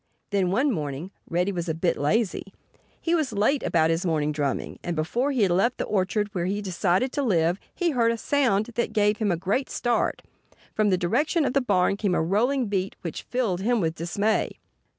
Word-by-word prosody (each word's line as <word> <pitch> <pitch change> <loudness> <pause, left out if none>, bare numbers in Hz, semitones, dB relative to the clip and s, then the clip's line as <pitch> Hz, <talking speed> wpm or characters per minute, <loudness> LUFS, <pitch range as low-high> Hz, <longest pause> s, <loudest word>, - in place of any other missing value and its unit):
Then, 195 -3 +1
one 260 +10 +2
morning, 150 - -4 0.2
Reddy 180 +3 +1
was 175 -2 -3
a 160 - -1
bit 170 +1 +1
lazy. 195 +5 0 0.5
He 335 - -1
was 310 -6 +1
late 220 +8 +2
about 160 -1 +2
his 165 +3 0
morning 155 -4 0
drumming. 145 -3 -2
And 175 - -2
before 235 - 0
he 250 -6 +2
had 190 - +2
left 210 +8 +2
the - - -1
orchard 205 +1 -1
where 175 -2 -1
he 195 - 0
had 205 0 -5
decided 185 +6 +1
to 285 - -1
live 175 -7 +2 0.2
he 350 -2 +1
heard 235 -4 +2
a 230 - -2
sound 235 -6 +1
that 235 - -1
gave 210 0 +2
him 210 -3 0
a 170 - 0
great 195 +10 -1
start. 240 -1 0 0.5
From 215 -1 +2
the 185 - +3
direction 290 - +1
of 255 - 0
the 275 - +3
barn 195 -4 +2
came 200 -4 0
a - - +1
rolling 240 +9 +1
beat 195 -2 -2
which 165 - -6
filled 225 -8 0
him 235 +3 +2
with 165 -4 0
dismay. 200 +6 -1
200 Hz, 210 wpm, -25 LUFS, 175-240 Hz, 0.5 s, the